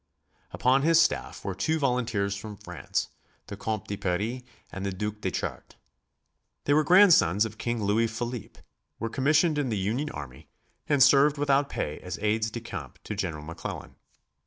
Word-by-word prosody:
Upon 130 +2 +2
his 165 +2 +5
staff - - 0
were 95 - -2
two 155 - 0
volunteers 120 -8 0
from 105 +1 -8
France, - - -4 0.4
the - - -7
Compte 110 -3 -3
de 100 - -3
Paris 105 +8 -2 0.3
and 95 - -6
the 100 - -1
Duc 105 +3 -4
de - - 0
Chartres. - - -5 0.9
They 145 - +2
were 155 +1 +4
grandsons 165 - +6
of 110 0 -8
King 120 -2 -2
Louis 110 +3 +2
Philippe, 120 0 -6 0.4
were 115 - -3
commissioned 150 +4 +3
in 140 -3 -1
the 110 - -1
Union 115 +10 -1
army 70 - -9 0.4
and 145 -3 +5
served 145 +1 +5
without 140 0 +2
pay 75 - -3
as 90 -1 -6
aides 110 +1 0
de 120 +2 -6
camp 90 - -7
to - - -5
General 85 -7 -3
McClellan. 85 +2 -7
110 Hz, 170 wpm, -27 LUFS, 100-140 Hz, 0.9 s, grandsons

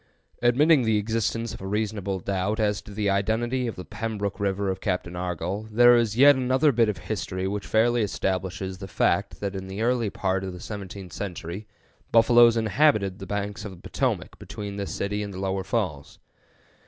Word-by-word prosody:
Admitting 140 +5 +5
the 110 -2 +2
existence 115 +1 -1
of - - -9
a 95 - -5
reasonable 100 -2 -2
doubt 100 +4 -1
as 105 -2 +1
to - - -13
the 105 0 -2
identity 115 +6 0
of 115 - -4
the 90 - -8
Pembrook 105 -2 -4
River 100 -1 0
of 95 - -6
Captain 90 -3 -2
Argoll, 90 +4 -3
there 120 +2 +6
is 115 -2 +1
yet 140 +2 +8
another 130 +3 +3
bit 115 -3 +3
of 105 - -2
history 95 -3 -3
which 100 0 -4
fairly 120 +2 +3
establishes 95 -1 -2
the 95 - -7
fact 85 - 0
that 100 -1 -2
in 95 0 -5
the 95 +3 -4
early 120 -2 +1
part 95 -1 -1
of 95 -1 -5
the 90 - -9
seventeenth 100 -2 -8
century 95 +1 -6 0.4
buffaloes 115 0 +6
inhabited 110 -3 +2
the 95 - -8
banks 105 +1 -3
of 105 - -5
the 95 - -11
Potomac - - -2
between 100 -1 -7
this 100 -1 -4
city 105 +1 -2
and 100 -2 -5
the - - -6
lower 95 0 -1
falls. 90 - -3
105 Hz, 190 wpm, -25 LUFS, 95-115 Hz, 0.4 s, yet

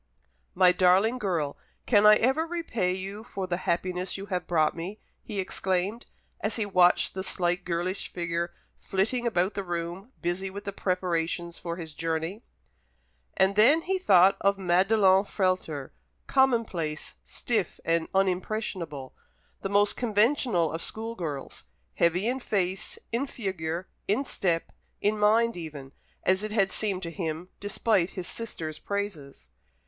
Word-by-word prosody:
"My 180 -1 +6
darling 190 +7 +4
girl, 170 -9 -1 0.3
can 210 -3 +5
I 210 - +9
ever 265 +9 +2
repay 280 - -1
you 195 +3 -5
for 195 -5 -4
the 175 -1 -1
happiness 180 +2 -1
you 195 - -6
have 180 -1 -2
brought 155 -3 +2
me!" 180 +6 -6 0.2
he 210 -3 -5
exclaimed, 190 +4 -1 0.3
as 215 - -1
he 220 - 0
watched 180 -3 +4
the 190 - -4
slight 180 -1 0
girlish 175 +2 -2
figure 170 0 -2 0.3
flitting 225 +6 0
about 190 -3 +1
the 200 - -2
room, 175 +5 -4
busy 180 +2 -2
with 200 +1 -7
the 200 -1 -5
preparations 175 -2 -1
for 170 -1 -4
his 165 -3 -8
journey. 165 +6 -2 1.0
And 190 +1 +4
then 275 +10 +6
he 380 +1 0
thought 190 - +6
of 200 0 +3
Madelon 190 +1 +4
Frehlter 185 -9 -1 0.3
commonplace, 225 - +1
stiff, 215 -8 -2
and 165 0 +1
unimpressionable 185 -6 -1 0.5
the 195 - -3
most 205 +1 +3
conventional 220 - +2
of 165 - -4
school 225 +5 -3
girls, 155 -9 -6 0.3
heavy 170 +4 +2
in 255 +2 0
face, 195 -5 -2
in 245 +5 0
figure, 185 -7 -4 0.2
in 235 +8 +1
step, 170 -8 -1 0.3
in 210 +1 +1
mind 225 +3 +4
even, 150 -6 -7 0.3
as 185 +1 +3
it 215 0 -3
had 195 -3 +2
seemed 195 -3 -1
to 170 - -4
him, 170 0 -4
despite 205 -2 +1
his 185 -2 -5
sister's 160 -9 -5
praises. 160 - -5
190 Hz, 145 wpm, -28 LUFS, 170-210 Hz, 1.0 s, I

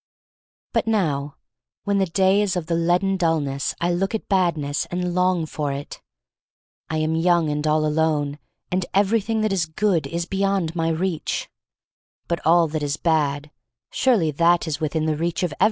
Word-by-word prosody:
But - - 0
now 150 -10 0 0.5
when 200 -1 +1
the 190 - +2
day 190 +3 +3
is 200 -2 0
of 175 -3 -2
the 170 - -2
leaden 175 +3 +1
dullness 150 -6 0
I 175 +1 +1
look 195 +5 -1
at 220 - -5
Badness 165 -7 0
and 180 0 -2
long 180 -2 +2
for 150 -2 -3
it. 140 +1 -7 0.9
I 160 - -1
am 155 +1 0
young 165 -2 +2
and 150 +1 -2
all 155 0 +2
alone, 150 -2 0 0.3
and 185 +1 +1
everything 220 +2 +2
that 215 -2 +1
is 175 -4 0
good 175 +1 0
is 170 0 -3
beyond 195 -3 -1
my 165 -1 0
reach. 165 0 -2 0.8
But 170 -1 -2
all 165 +1 +4
that 155 0 -3
is 145 +1 -1
bad 150 -3 0 0.2
— 120 0 -66
surely 220 -12 +2
that 170 +3 +3
is 150 -2 -2
within 155 0 -1
the 155 -1 +1
reach 170 +3 -2
of 175 -4 -1
every - - -13
one. - - -41
165 Hz, 185 wpm, -23 LUFS, 155-185 Hz, 0.9 s, all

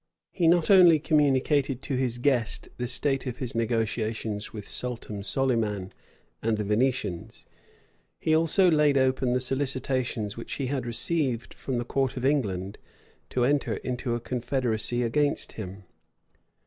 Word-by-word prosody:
He 170 -3 +1
not 170 +2 +4
only 180 -4 +8
communicated 140 -3 +2
to 140 - -2
his 125 -2 -1
guest 120 -3 0
the 125 - -2
state 135 +2 -1
of 125 -1 -4
his 125 -3 -4
negotiations 110 -2 -2
with 105 -2 -8
Sultan 115 -4 -3
Solyman 110 -5 -1 0.5
and 110 -1 0
the 105 - -1
Venetians; 105 -4 -1 0.7
he 155 - +1
also 165 +3 +4
laid 150 -2 +4
open 130 -1 +2
the 125 - +2
solicitations 130 -4 -2
which 115 - -7
he 140 - -2
had 130 -2 -2
received 125 0 -1
from 130 -2 -4
the 120 - -2
court 135 +1 -1
of 125 - -2
England 100 -9 0 0.5
to 125 -1 +1
enter 145 +2 +1
into 125 -1 -3
a - - -2
confederacy 120 -1 -1
against 145 +5 0
him. 100 -2 -8
125 Hz, 145 wpm, -27 LUFS, 115-140 Hz, 0.7 s, only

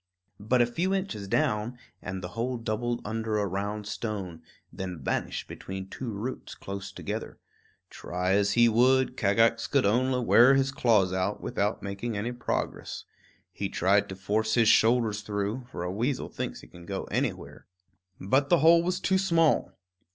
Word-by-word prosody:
But 120 +4 +3
a - - +3
few 175 +11 -1
inches 185 - -3
down, 120 -1 0 0.2
and 95 0 -5
the 90 - -4
hole 120 +6 -2
doubled 115 +1 -2
under 110 0 -2
a 105 - +1
round 100 +2 -3
stone, 100 -5 -5 0.3
then 90 -2 -5
vanished 65 - -3
between 95 0 -7
two 125 +4 -6
roots 110 +5 -5
close 100 0 -7
together. - - -5 0.5
Try 90 +1 -3
as 100 +1 +3
he 120 0 +5
would, 130 +3 +3
Kagax 115 +3 +2
could 140 -2 +2
only 125 +5 +2
wear 125 +4 +7
his 135 0 +2
claws 105 -8 +2
out, 95 +2 -1
without 105 +2 -2
making 100 +3 -4
any 110 +4 -2
progress. 120 0 -3 0.5
He - - -4
tried 100 +2 +2
to 95 - -5
force 105 +4 0
his 115 -2 +5
shoulders 110 -2 +3
through; 105 +4 -3
for 85 - -5
a 90 - -2
weasel 120 +7 -2
thinks - - -5
he - - -14
can 85 -1 -14
go 95 -1 -3
anywhere. - - -3 0.5
But 135 +9 +1
the 175 - +6
hole 165 +2 +6
was 180 +2 -1
too 190 0 +2
small. 165 -4 +2
110 Hz, 165 wpm, -28 LUFS, 100-125 Hz, 0.5 s, wear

